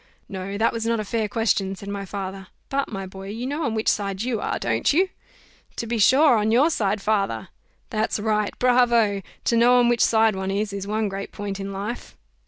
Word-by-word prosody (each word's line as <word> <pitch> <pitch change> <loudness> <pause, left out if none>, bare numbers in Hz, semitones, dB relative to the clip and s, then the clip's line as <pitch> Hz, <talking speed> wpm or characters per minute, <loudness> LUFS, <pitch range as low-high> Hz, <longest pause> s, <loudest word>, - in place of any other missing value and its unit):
"No! 195 +1 -5
that 225 +2 +2
was 230 -1 -3
not 230 0 0
a - - -1
fair 220 0 -1
question," 200 -3 0
said 200 - -11
my 200 -1 -4
father; 195 -1 -6 0.2
"but, 275 0 -1
my 195 -2 -4
boy, 190 +1 -9
you 225 +4 -5
know 290 +4 -2
on 225 - -1
which 220 - -2
side 200 0 0
you 240 -3 -1
are, - - -1
don't 115 -1 +1
you?" 370 +5 +3 0.7
"To - - -4
be 230 0 -2
sure 260 +4 +6
on 210 +1 +1
your 275 +8 +4
side, 205 -6 0
father." 205 -2 0 0.4
"That's 220 -1 -1
right 210 -1 0
bravo! 240 -5 +3 0.2
To 235 - +1
know 240 +2 +5
on 240 -1 +4
which 240 -1 +3
side 220 -2 +3
one 190 0 -3
is, 200 +1 -1
is 200 0 -5
one 215 +1 0
great 195 0 -5
point 200 -1 -5
in 195 0 -5
life." 205 +5 -6
215 Hz, 215 wpm, -23 LUFS, 195-235 Hz, 0.7 s, sure